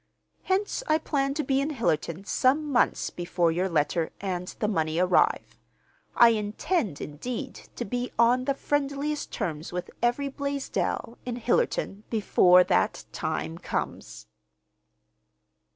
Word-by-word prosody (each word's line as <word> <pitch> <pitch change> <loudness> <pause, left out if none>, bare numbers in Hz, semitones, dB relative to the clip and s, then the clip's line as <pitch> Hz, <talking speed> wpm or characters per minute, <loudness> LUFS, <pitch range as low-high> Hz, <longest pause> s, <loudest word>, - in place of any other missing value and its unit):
Hence, 390 +5 0
I 310 - +4
plan 275 -3 -1
to 305 - -1
be 270 0 +1
in 285 - -1
Hillerton 195 - -1
some 285 +7 +2
months 245 - +2
before 175 -1 0
your 180 +3 0
letter 160 +1 +1
and 180 -2 -3
the 210 - 0
money 160 -6 0
arrive. 180 +1 +2 0.6
I 235 - +8
intend, 215 - -1
indeed, 245 - -6
to 240 - -4
be 245 +1 -3
on 245 +2 +4
the 275 0 +1
friendliest 290 +1 -2
terms 160 -2 -4
with 180 0 -5
every 245 +4 +1
Blaisdell 280 -4 -3
in 245 -1 -4
Hillerton 225 -3 0
before 180 -4 +5
that - - +1
times 80 0 -3
comes." - - -4
235 Hz, 130 wpm, -27 LUFS, 180-275 Hz, 0.6 s, I